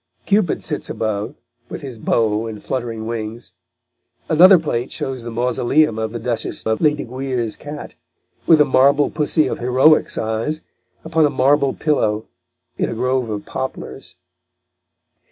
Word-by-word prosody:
Cupid 200 -4 +1
sits - - -3
above, 110 +4 -3 0.3
with - - -6
his 130 -5 -8
bow 110 0 +1
and 110 -2 -8
fluttering 115 -3 -4
wings. 115 0 -6 0.8
Another 180 +4 +8
plate 130 -7 -2
shows 130 -2 -4
the 120 - -7
mausoleum 120 +2 +1
of 110 -1 -2
the 120 - -4
Duchess 115 -1 -3
of 110 0 0
Lesdiguières' 130 -5 -1
cat, 145 0 -8 0.5
with 160 -2 +6
a 150 - +6
marble 140 +2 +3
pussy 155 0 +1
of - - -3
heroic 130 +6 +4
size, 115 +8 -2 0.4
upon 160 -1 +3
a - - -1
marble 140 +1 +2
pillow, 110 -8 0 0.5
in - - 0
a - - -4
grove 125 0 0
of 105 -1 -4
poplars. 130 -6 -6
125 Hz, 140 wpm, -20 LUFS, 115-145 Hz, 0.8 s, Another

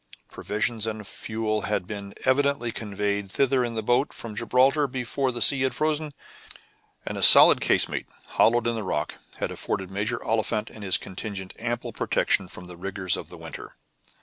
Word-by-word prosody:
Provisions 110 +1 -2
and 110 -1 -5
fuel 110 +1 -3
had 105 -3 0 0.4
evidently 140 -2 +2
been - - -18
conveyed 100 -2 -2
thither 135 +3 +2
in 120 -1 -3
the 110 - -2
boat 125 +6 +1
from 110 -3 -8
Gibraltar 130 +6 +2
before 130 +1 -2
the 120 -1 0
sea 135 -2 +5
had 130 0 0
frozen, 155 -1 -1 0.9
and - - -4
a - - -4
solid - - +9
casemate, - - +2 0.2
hollowed 120 0 +3
in 120 - +1
the 115 - -3
rock, 75 -7 -3 0.2
had - - -2
afforded 95 -1 -3
Major 105 +5 -1
Oliphant 110 -1 -1
and 110 - -11
his 95 -2 +4
contingent 95 0 -7
ample 120 0 -3
protection 100 -2 +1
from 90 0 -11
the 90 -1 -10
rigor 95 +1 -6
of - - -7
the - - -10
winter. - - -9
115 Hz, 175 wpm, -25 LUFS, 100-125 Hz, 0.9 s, solid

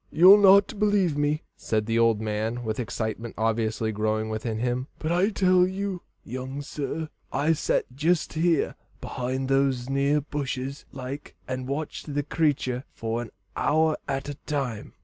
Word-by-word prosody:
"You'll 185 +6 +8
not 200 +1 +6
believe 205 -7 +3
me," 145 +1 0
said 110 -1 -1
the 115 +1 +1
old 115 -2 +4
man, 110 +3 -2
with 110 0 -2
excitement 115 -1 -3
obviously 110 0 0
growing 110 +1 -1
within 110 0 -3
him, 125 +3 -1
"but 155 - -2
I 180 +4 +3
tell 185 -3 +4
you, 190 -1 -3 0.2
young 130 +4 -5
sir, 150 +3 -4 0.2
I've 155 +1 +1
sat - - +1
jist 160 +5 +1
here 165 -1 +2 0.3
behind 130 +1 -3
those 135 -2 +1
near 140 +2 +2
bushes 140 -2 -4
like, 135 +2 -7
and 130 0 -3
watched 145 +1 -4
the 145 - +1
creatur 140 -5 0
for 115 +1 -3
an 115 - -7 0.3
hour 155 +1 +2
at 135 0 -2
a 145 - -3
time." 135 -8 -3
135 Hz, 155 wpm, -26 LUFS, 115-155 Hz, 0.3 s, You'll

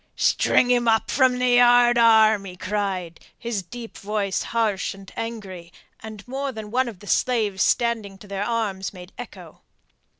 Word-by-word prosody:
"String 250 - +2
him 240 -1 +2
up 225 -1 +2
from 260 -2 +3
the 250 -1 +3
yardarm," 235 -3 +5
he 185 -2 -9
cried, 185 -4 -3 0.2
his 230 -4 -3
deep 230 +6 -10
voice 200 -1 -2
harsh 215 -5 -1
and 195 -1 -14
angry, 195 -7 -7 0.3
and 215 -1 -10
more 270 +2 -3
than 220 -3 -8
one 255 +1 +1
of 205 -4 -12
the - - -12
slaves 215 -4 0
standing 225 -5 0
to 205 - -15
their 200 0 -3
arms 205 -5 -2
made 180 0 -12
echo. - - -11
220 Hz, 160 wpm, -23 LUFS, 195-240 Hz, 0.3 s, yardarm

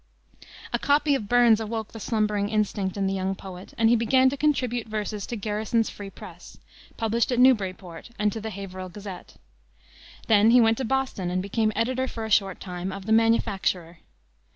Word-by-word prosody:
A 240 - +1
copy 290 +2 +2
of 215 -7 -2
Burns 240 -2 +5
awoke 220 0 -4
the 225 - -9
slumbering 210 -2 0
instinct 205 -3 -1
in 195 - 0
the 195 - 0
young 190 0 -2
poet, 185 -1 -11
and 225 - +3
he 235 - +5
began 260 +3 +3
to - - -2
contribute 250 -6 0
verses 210 -1 -4
to 240 - -4
Garrison's 215 +2 -1
Free 200 -1 -8
Press, - - -12 0.4
published 225 +2 0
at 245 - 0
Newburyport, 190 -8 +1
and 210 0 +1
to 225 - -5
the 220 - -4
Haverhill 185 -2 -7
Gazette. 195 -1 -9 0.9
Then 215 -1 +5
he 245 +2 +7
went 225 0 +3
to 265 - -1
Boston, 260 -8 -1
and 180 +1 -1
became 215 +3 0
editor 255 +3 0
for 225 -3 -5
a 220 - -6
short 195 -2 +2
time 180 0 -5
of 195 0 -8
the 220 - -3
Manufacturer. 190 -6 +1
215 Hz, 185 wpm, -25 LUFS, 195-235 Hz, 0.9 s, he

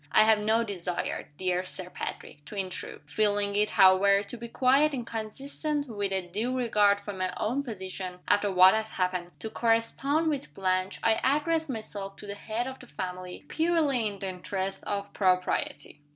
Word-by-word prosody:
I 215 - +7
have 220 -1 +5
no 220 +2 +2
desire, 180 -5 -3
dear 185 -1 0
Sir 180 0 -7
Patrick, 145 - -6
to 210 - -9
intrude. 190 -2 -4
Feeling 205 +4 +1
it, 210 +1 +3
however, 195 +1 +6
to 205 - -8
be 235 0 -7
quite 275 +5 +3
inconsistent 270 +6 -3
with 205 -4 -2
a 190 -2 -1
due 230 +8 -2
regard 210 -4 +3
for 205 0 -6
my 185 -1 -2
own 245 +6 0
position 190 -6 -6
after 205 0 +3
what 185 0 +8
has 220 0 -1
happened 180 -2 -1
to 220 - -6
correspond 240 +7 +1
with 260 - -4
Blanche, 185 0 0
I 225 -1 +3
address 315 +3 +1
myself 205 -5 -5
to - - -11
the 200 - -5
head 220 +3 -3
of 265 0 -7
the 250 - -13
family, 180 -2 -6
purely 315 -8 +2
in 205 -1 -5
the 195 0 -4
interests 190 +1 -4
of 200 0 -4
propriety. 180 -6 0
205 Hz, 175 wpm, -28 LUFS, 185-235 Hz, -, what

